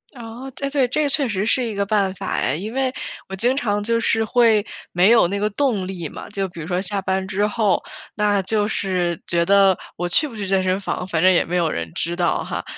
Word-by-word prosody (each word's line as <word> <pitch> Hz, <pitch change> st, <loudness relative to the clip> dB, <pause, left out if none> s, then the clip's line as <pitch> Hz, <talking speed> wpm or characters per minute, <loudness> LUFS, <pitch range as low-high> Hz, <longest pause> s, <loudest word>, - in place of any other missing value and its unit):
哦， 240 Hz, +3 st, -8 dB
对 275 Hz, 0 st, -3 dB
对， 275 Hz, -3 st, +2 dB
这 290 Hz, +3 st, 0 dB
确 275 Hz, -1 st, +2 dB
实 200 Hz, -1 st, -1 dB
是 250 Hz, +2 st, +2 dB
一 220 Hz, -3 st, -4 dB
个 200 Hz, 0 st, 0 dB
办 195 Hz, -2 st, +1 dB
法 -, -, -6 dB
哎， 130 Hz, -, 0 dB
因 210 Hz, +7 st, -5 dB
为 265 Hz, -1 st, 0 dB, 0.3 s
我 190 Hz, -, -5 dB
经 245 Hz, +6 st, +1 dB
常 205 Hz, -5 st, 0 dB
就 230 Hz, +1 st, +1 dB
是 225 Hz, -1 st, +1 dB
会 225 Hz, -2 st, +3 dB, 0.3 s
没 180 Hz, +4 st, +5 dB
有 230 Hz, -7 st, +6 dB
那 200 Hz, +2 st, -2 dB
个 210 Hz, +1 st, 0 dB
动 215 Hz, -5 st, 0 dB
力 180 Hz, -4 st, -5 dB
嘛， -, -, -9 dB
就 195 Hz, -2 st, -2 dB
比 170 Hz, -2 st, -9 dB
如 155 Hz, -, -7 dB
说 180 Hz, 0 st, 0 dB
下 195 Hz, +1 st, -2 dB
班 190 Hz, 0 st, -1 dB
之 205 Hz, +1 st, 0 dB
后， 210 Hz, -3 st, +1 dB, 0.3 s
那 205 Hz, -2 st, +2 dB
就 210 Hz, +1 st, 0 dB
是 180 Hz, -5 st, -1 dB
觉 170 Hz, 0 st, +1 dB
得， 195 Hz, -1 st, +5 dB, 0.2 s
“我 175 Hz, -, -1 dB
去 285 Hz, -, +2 dB
不 250 Hz, -, -11 dB
去 200 Hz, -2 st, -4 dB
健 190 Hz, -1 st, +2 dB
身 185 Hz, +1 st, +1 dB
房， 180 Hz, -2 st, -3 dB
反 165 Hz, -3 st, -1 dB
正 185 Hz, -, +6 dB
也 175 Hz, -, +3 dB
没 180 Hz, +2 st, -2 dB
有 165 Hz, -2 st, +2 dB
人 85 Hz, -, -4 dB
知 170 Hz, +1 st, -2 dB
道 175 Hz, -, +1 dB
哈， -, -, -4 dB
200 Hz, 265 characters per minute, -21 LUFS, 185-225 Hz, 0.3 s, 有